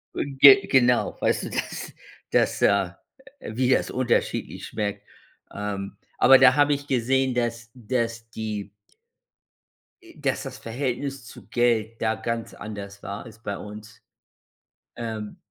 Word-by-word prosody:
Und 140 -1 -4
ge 145 +8 +9
genau, 125 -2 +3
weißt - - +1
du, - - -5
dass - - -4 0.4
dass, - - +2
äh, 100 -3 +3 0.5
wie 125 +3 -1
das 130 - +2
unterschiedlich 125 -2 -1
schmeckt. 105 -2 -4 0.5
Ähm, 100 -1 -5 0.2
aber 135 0 +8
da 130 0 +6
habe 145 0 +4
ich 145 0 -4
gesehen, 130 +1 +1
dass 120 -1 -2
dass 115 -1 -3
die 105 -3 -5 1.3
Äh, 345 -2 -17
dass 140 -3 -1
das 130 -1 -7
Verhältnis 130 +2 -4
zu - - -13
Geld 115 -2 0
da 110 0 +1
ganz 115 0 -4
anders 100 -2 -8
war 100 +2 -6
als 110 -2 -13
bei 100 -3 -4
uns. 105 +1 -11 0.9
Ähm 110 -3 -5
115 Hz, 135 wpm, -25 LUFS, 110-130 Hz, 1.3 s, ge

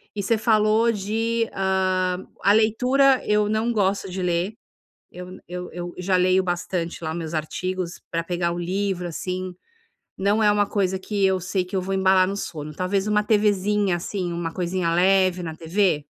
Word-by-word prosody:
E 200 - -2
você 225 +3 +2
falou 220 +1 +3
de, 225 +2 -1
hã, 185 -1 0 0.2
a 200 - +5
leitura, 250 +5 +3
eu 210 0 +3
não 220 +2 0
gosto 195 -2 0
de 185 +1 -4
ler. 180 +3 0 0.6
Eu 180 0 -9
n - - -12
eu 180 0 -6
eu 175 0 -6
já 185 +1 0
leio 185 +1 +3
bastante 175 -1 -3
lá 160 0 -2
meus 165 -1 -5
artigos, 175 +3 -3
pra 165 0 -1
pegar 170 0 -1
o 175 - -4
livro, 185 0 -2
assim, 185 +2 -4 0.6
não 205 +3 +2
é 210 - +5
uma 205 -1 +2
coisa 190 -2 0
que 200 +1 -2
eu 190 -1 +2
sei 180 +1 -1
que 185 - -7
eu 190 - +1
vou 190 +1 -3
embalar 190 -1 +4
no 195 - -3
sono. 155 -5 -6
Talvez 190 +4 -1
uma 210 0 +2
TVzinha, 205 -2 +2
assim, 175 0 -4
uma 170 -1 -3
coisinha 175 -2 -1
leve 185 0 +3
na 160 -2 -5
TV? 165 -2 0
185 Hz, 180 wpm, -23 LUFS, 175-205 Hz, 0.6 s, a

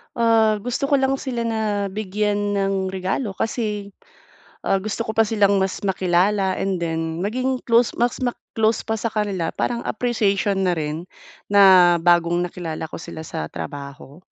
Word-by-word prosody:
Ah, 225 -2 +3
gusto 245 +5 -3
ko 280 - +5
lang 270 0 +2
sila 240 -4 -3
na 215 -3 -1
bigyan 210 +1 -1 0.2
ng 195 -1 0
regalo 190 +4 -2
kasi, 210 -1 -3 0.7
ah, 195 - +1
gusto 215 +3 -3
ko 220 - -5
pa 225 -1 +4
silang 200 -2 +3
mas 190 0 -1
makilala 190 +1 +1
and 190 -2 -1
then 165 -1 -2
maging 255 +7 -1
close 235 0 +4
mas 240 0 +1
ma-close 225 -3 -1
pa 220 - 0
sa 230 - -2
kanila 200 -6 -1
parang 235 -1 -1
appreciation 205 -4 0
na 180 -2 +2
rin, 155 +2 -3 0.5
na 185 -4 +7
bagong 175 0 +3
nakilala 165 -3 -5
ko - - -13
sila 160 -2 -8
sa 75 - -4
trabaho. 140 +2 -8
200 Hz, 155 wpm, -22 LUFS, 180-225 Hz, 0.7 s, na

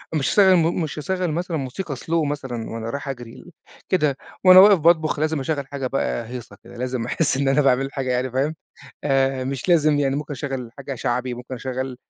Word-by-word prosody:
مش 135 -3 +1
هاشغّل 190 -3 +5
مو 165 0 +3
مش 155 -3 -3
هاشغل 180 +1 -2
مثلًا 170 0 -2
موسيقى 140 +3 -5
slow 165 +4 -1
مثلًا 130 -6 -5
وأنا 115 0 -5
رايح 140 +2 -5
أجري، 120 -3 -6
ل 180 - -14 0.4
كده 150 -7 +1 0.3
وأنا 185 0 +10
واقف 200 -2 +8
باطبخ 160 -2 +3
لازم 155 -1 0
أشغّل 140 0 -2
حاجة 135 -2 -4
بَقى 120 -3 -2
هيصة 120 -5 -8
كده، 120 0 -13
لازم 125 -1 -3
أحس 140 +1 0
إن 140 0 0
أنا 135 +2 +3
باعمل 135 0 +2
حاجة 130 -2 -2
يعني 125 0 -1
فاهم، 140 +5 -1 0.5
آآ 135 -2 +1
مش 135 +3 -4
لازم 155 -4 +4
يعني 135 0 +1
ممكن 150 0 -5
أشغّل 130 -3 -5
حاجة 135 0 -5
شعبي، 125 +1 -2
ممكن 125 +2 -8
أشغّل 130 0 -4
135 Hz, 205 wpm, -22 LUFS, 130-155 Hz, 0.5 s, وأنا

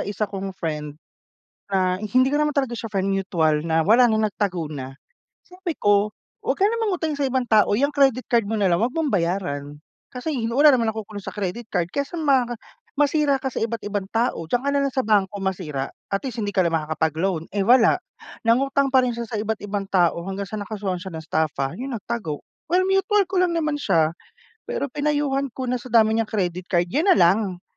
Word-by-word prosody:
isa 205 +1 -2
kong 195 -2 -6
friend, 150 -4 -4 0.7
na 185 -2 +2
hindi 250 +5 +3
ko 290 +2 +1
naman 300 - +1
talaga 270 -4 -1
siya 225 -1 -6
friend, 195 -2 -1
mutual 175 -6 +1
na 160 0 +1
wala 240 +3 +6
na, 220 0 +2
nagtago 190 -5 -2
na. 135 -3 -7 0.4
Sabi 360 -1 -6
ko, 205 -3 +2 0.3
"Wag - - -1
ka 400 - +5
ng 460 +1 -2
mangutang 325 -7 -1
sa 285 - 0
ibang 260 -2 -1
tao, 215 -2 +4
'yang 275 +7 +2
credit 270 -4 +2
card 235 -3 +3
mo 220 - -3
na 195 - +3
lang 170 - +3
wag 235 +6 0
mong 320 -3 0
bayaran. 165 - -2 0.3
Kasi 265 +3 -3 0.2
wala 290 +3 +7
namang 230 -5 +2
nakukulong 210 -2 -7
sa - - -6
credit 210 +3 -4
card 175 -5 -1
kaysa 280 - -3
maka 260 -5 +2 0.4
masira 290 -1 +2
ka 265 - -1
sa - - -9
iba't 230 0 -2
ibang 205 -1 -3
tao, 230 -7 0
diyan 245 +10 0
ka 280 - -1
nalang 280 -1 0
sa 260 - +1
bangko 210 -4 +2
masira 170 -8 -3 0.2
at 195 - 0
least 255 -4 -5
hindi 205 - -3
ka 190 - +3
na 170 - +2
makakapag-loan." 160 +2 -1
Eh, 200 -1 -1
wala, 240 - +5 0.5
nangutang 275 +3 +2
pa 260 - +6
rin 245 -2 -1
siya 235 - -3
sa 220 -2 -3
iba't 220 0 -2
ibang 200 -1 -4
tao 175 -3 +2
hanggang 195 +1 -4
sa 210 +2 -5
nakasuhan 200 -4 -4
siya 190 - -6
ng 160 -2 -8
staffa, 145 -4 -1
yun 255 0 -4
nagtago. 205 -8 -5 0.2
Well, 365 +2 +3
mutual 390 +1 +2
ko 370 0 0
lang 345 -2 +1
naman 305 -3 -1
siya. 160 -1 +2 0.5
Pero 280 - -3
pinayuhan 290 -1 0
ko 260 - -5
na 250 - 0
sa 240 - -13
dami 225 -2 +4
niyang 225 - +1
credit 180 -4 -2
card 175 -2 +1
yun 305 - +1
na 380 - +7
lang. 185 - +2
215 Hz, 210 wpm, -23 LUFS, 185-270 Hz, 0.7 s, wala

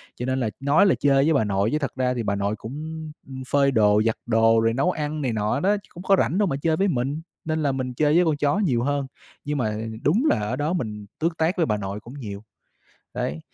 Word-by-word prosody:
cho 125 - -4
nên 130 +1 0
là 115 -4 0
nói 140 +7 +4
là 195 - +4
chơi 135 -1 +4
với 160 - +3
bà 135 - +3
nội 100 +1 +1
chứ 150 - +1
thật 140 - -2
ra 125 -1 0
thì 120 -2 -3
bà 100 - 0
nội 100 +1 -1
cũng, 110 +4 -8
ưm, 155 +1 -6 0.2
ừm, 130 - -6
phơi 140 -1 +3
đồ, 105 -3 +4
giặt 115 - +2
đồ 115 0 +4
rồi 115 0 +2
nấu 155 +9 +1
ăn 150 -1 -3
này 130 -4 -1
nọ 110 +5 0
đó, 200 +6 +2
chứ - - -22
cũng 175 - -9
có 195 +1 +4
rảnh 175 - +1
đâu 205 -1 +3
mà 135 - -1
chơi 160 -1 +1
với 195 - +2
mình. 140 -1 -1 0.2
Nên 155 -1 -1
là 140 - +2
mình 130 -1 -3
chơi 150 +3 +2
với 175 0 +5
con 155 -2 +1
chó 145 +6 +1
nhiều 125 - +1
hơn. 140 0 -1 0.4
Nhưng 145 0 -2
mà 110 -4 -1 0.3
đúng 210 - +2
là - - +2
ở 105 +4 -2
đó 150 +6 -1
mình 105 - -4
tước 165 +1 -1
tác 165 +4 +1
với 165 - +3
bà 105 -2 0
nội 100 0 -5
cũng 120 +4 -12
nhiều. 100 -4 -7 0.7
Đấy, 75 +3 -3
135 Hz, 270 wpm, -24 LUFS, 115-155 Hz, 0.7 s, với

